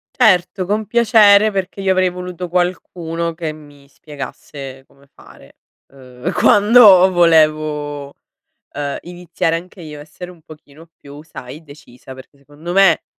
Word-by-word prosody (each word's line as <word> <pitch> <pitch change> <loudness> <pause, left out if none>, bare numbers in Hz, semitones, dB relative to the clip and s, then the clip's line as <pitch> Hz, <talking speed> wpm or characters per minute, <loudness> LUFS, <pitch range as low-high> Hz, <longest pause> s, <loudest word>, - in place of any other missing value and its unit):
Certo, 185 -5 +1
con 210 +2 -3
piacere, 215 -2 +4
perché 195 0 -5
io 190 - 0
avrei 185 -1 +1
voluto 180 0 -8
qualcuno 170 -2 -3
che 160 -2 -5
mi 145 -2 -18
spiegasse 135 -1 -10
come 140 0 -25
fare, 70 - -19 0.4
uhm, 125 -2 -8
quando 205 -3 +5
volevo, 155 -4 +1 0.7
uhm, 145 -1 -4
iniziare 175 -2 -4
anche 180 +2 -11
io 150 -3 -10
essere 170 +4 -11
un 170 -3 -18
pochino 155 0 -17
più, 145 +1 -14
sai, 150 -1 -12
decisa, 140 -4 -15
perché, 130 +2 -15
secondo 145 +5 -10
me, 195 -4 +3
165 Hz, 130 wpm, -17 LUFS, 145-185 Hz, 0.7 s, quando